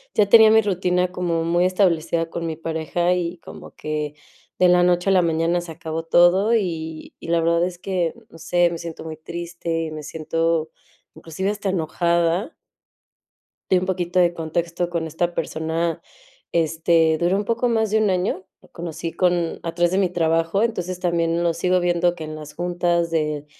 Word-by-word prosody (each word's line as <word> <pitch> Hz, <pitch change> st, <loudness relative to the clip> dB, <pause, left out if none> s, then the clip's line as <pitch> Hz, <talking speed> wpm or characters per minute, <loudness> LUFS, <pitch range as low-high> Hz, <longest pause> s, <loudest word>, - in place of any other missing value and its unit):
ya 205 Hz, -1 st, +3 dB
tenía 220 Hz, -1 st, +8 dB
mi 220 Hz, 0 st, +6 dB
rutina 180 Hz, -2 st, 0 dB
como 170 Hz, -3 st, -1 dB
muy 175 Hz, +2 st, +2 dB
establecida 170 Hz, -3 st, +1 dB
con 170 Hz, 0 st, -4 dB
mi 160 Hz, -, -3 dB
pareja, 165 Hz, +2 st, -1 dB
y 175 Hz, -1 st, -2 dB
como -, -, -11 dB
que 150 Hz, -1 st, -4 dB, 0.4 s
de 180 Hz, -, +6 dB
la 180 Hz, 0 st, +5 dB
noche 180 Hz, +1 st, +2 dB
a -, -, +4 dB
la 185 Hz, -, +5 dB
mañana 165 Hz, +1 st, +1 dB
se 170 Hz, -1 st, -9 dB
acabó 160 Hz, 0 st, -5 dB
todo, 175 Hz, +6 st, +4 dB
y 160 Hz, -6 st, -3 dB
y -, -, -10 dB
la 170 Hz, 0 st, +3 dB
verdad 170 Hz, +1 st, +2 dB
es 180 Hz, -1 st, -6 dB
que, 180 Hz, -3 st, -1 dB, 0.2 s
no 165 Hz, -, -15 dB
sé, 175 Hz, +1 st, +2 dB
me 170 Hz, -, -4 dB
siento 165 Hz, -1 st, -7 dB
muy 160 Hz, -1 st, -6 dB
triste 170 Hz, 0 st, -4 dB
y 155 Hz, -, -6 dB
me 155 Hz, -1 st, -7 dB
siento 160 Hz, +1 st, -1 dB, 0.5 s
inclusive 190 Hz, +5 st, -4 dB
hasta 205 Hz, -1 st, -3 dB
enojada. 170 Hz, -, 0 dB, 1.2 s
Y 185 Hz, -, +6 dB
un 180 Hz, -, -1 dB
poquito 180 Hz, -1 st, -1 dB
de 175 Hz, -1 st, +4 dB
contexto. 170 Hz, +1 st, -2 dB
Con 170 Hz, -2 st, -2 dB
esta 170 Hz, +2 st, -2 dB
persona, 165 Hz, +1 st, -2 dB, 0.5 s
este, 160 Hz, 0 st, +2 dB
duró 175 Hz, +3 st, +2 dB
un 205 Hz, -, -2 dB
poco 235 Hz, +2 st, 0 dB
más 220 Hz, -2 st, +1 dB
de 220 Hz, -, +3 dB
un 215 Hz, -2 st, +2 dB
año, 185 Hz, 0 st, -1 dB, 0.2 s
lo -, -, -20 dB
conocí 165 Hz, -1 st, -6 dB
con 175 Hz, -2 st, 0 dB
a 165 Hz, 0 st, -5 dB
través 175 Hz, 0 st, +2 dB
de 190 Hz, -, +1 dB
mi 190 Hz, -2 st, +2 dB
trabajo, 165 Hz, +3 st, +1 dB
entonces, 185 Hz, -6 st, -2 dB
también 170 Hz, -1 st, 0 dB
lo 170 Hz, -, +2 dB
sigo 180 Hz, +2 st, +1 dB
viendo 175 Hz, 0 st, +1 dB
que 165 Hz, -, -7 dB
en 155 Hz, 0 st, -6 dB
las 150 Hz, -1 st, -9 dB
juntas 175 Hz, -1 st, 0 dB
de 150 Hz, -2 st, -1 dB
170 Hz, 190 wpm, -22 LUFS, 165-180 Hz, 1.2 s, tenía